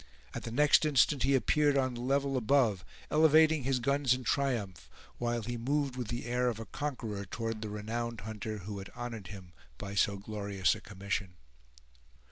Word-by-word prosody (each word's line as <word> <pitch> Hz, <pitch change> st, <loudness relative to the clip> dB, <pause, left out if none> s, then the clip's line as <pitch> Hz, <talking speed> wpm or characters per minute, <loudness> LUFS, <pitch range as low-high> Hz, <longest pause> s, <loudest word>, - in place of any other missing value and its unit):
At -, -, -4 dB
the 115 Hz, -, -6 dB
next 145 Hz, +6 st, +5 dB
instant 145 Hz, -2 st, +3 dB
he 135 Hz, +2 st, +3 dB
appeared 145 Hz, +2 st, +3 dB
on 130 Hz, -1 st, +1 dB
the 120 Hz, -, -6 dB
level 135 Hz, +2 st, +1 dB
above, 115 Hz, -6 st, +2 dB, 0.3 s
elevating 155 Hz, 0 st, +5 dB
his 135 Hz, -1 st, +1 dB
guns 140 Hz, 0 st, +2 dB
in 130 Hz, -, -7 dB
triumph, 105 Hz, -, -1 dB, 0.3 s
while 120 Hz, -1 st, -1 dB
he 120 Hz, +2 st, -4 dB
moved 140 Hz, +2 st, -1 dB
with 125 Hz, -3 st, -4 dB
the 120 Hz, +2 st, -4 dB
air 125 Hz, +1 st, 0 dB
of 115 Hz, -2 st, -4 dB
a 115 Hz, -, -6 dB
conqueror 115 Hz, -9 st, -4 dB
toward 115 Hz, +3 st, -4 dB
the 110 Hz, -, -4 dB
renowned 115 Hz, +2 st, -4 dB
hunter 110 Hz, +1 st, -5 dB
who 100 Hz, -1 st, -5 dB
had 95 Hz, -, -8 dB
honored 120 Hz, -5 st, -6 dB
him 95 Hz, -4 st, -10 dB, 0.2 s
by 100 Hz, +7 st, -6 dB
so 100 Hz, 0 st, +2 dB
glorious 100 Hz, -3 st, 0 dB
a -, -, -8 dB
commission. 100 Hz, -2 st, -4 dB
120 Hz, 180 wpm, -31 LUFS, 105-135 Hz, 0.3 s, next